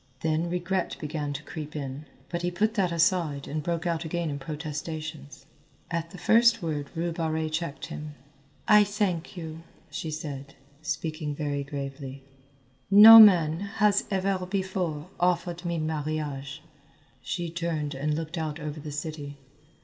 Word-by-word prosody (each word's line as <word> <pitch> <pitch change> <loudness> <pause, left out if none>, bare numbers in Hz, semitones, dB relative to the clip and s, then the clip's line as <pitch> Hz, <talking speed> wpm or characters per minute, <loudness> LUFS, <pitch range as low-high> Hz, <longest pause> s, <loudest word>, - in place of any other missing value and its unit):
Then 160 +2 0
regret 180 +1 -1
began 150 -1 -3
to 140 +2 -6
creep 155 -2 -7
in, 140 0 -5 0.2
but 170 0 -3
he 175 - 0
put 210 +5 0
that 190 -6 +1
aside 165 -4 +1
and 155 +1 -3
broke 170 +2 -2
out 165 -1 0
again 170 -1 -2
in 140 - -4
protestations. 155 -1 -6 0.5
At 170 0 -2
the 185 - -11
first 230 +1 +4
word 150 -3 -3
Rue 170 +1 -1
Barrée 160 -1 -1
checked 160 -2 -3
him. 150 0 -7 0.5
"I 210 -1 +7
thank 200 -4 -2
you," 160 -1 -7 0.3
she 160 - -4
said, 145 -3 -6 0.3
speaking 155 -2 -3
very 145 -1 -2
gravely. 135 -1 -6 0.7
"No 215 +3 +11
man 170 -7 +7
has 205 0 +1
ever 190 -1 0
before 185 -5 -2
offered 175 0 0
me 170 -1 -1
marriage." 150 -2 -3 0.6
She 175 -3 -3
turned 165 -3 -2
and 145 +3 -1
looked 165 +2 -4
out 155 -1 -3
over 150 0 -5
the 150 0 -7
city. 150 -1 -5
160 Hz, 150 wpm, -27 LUFS, 150-175 Hz, 0.7 s, No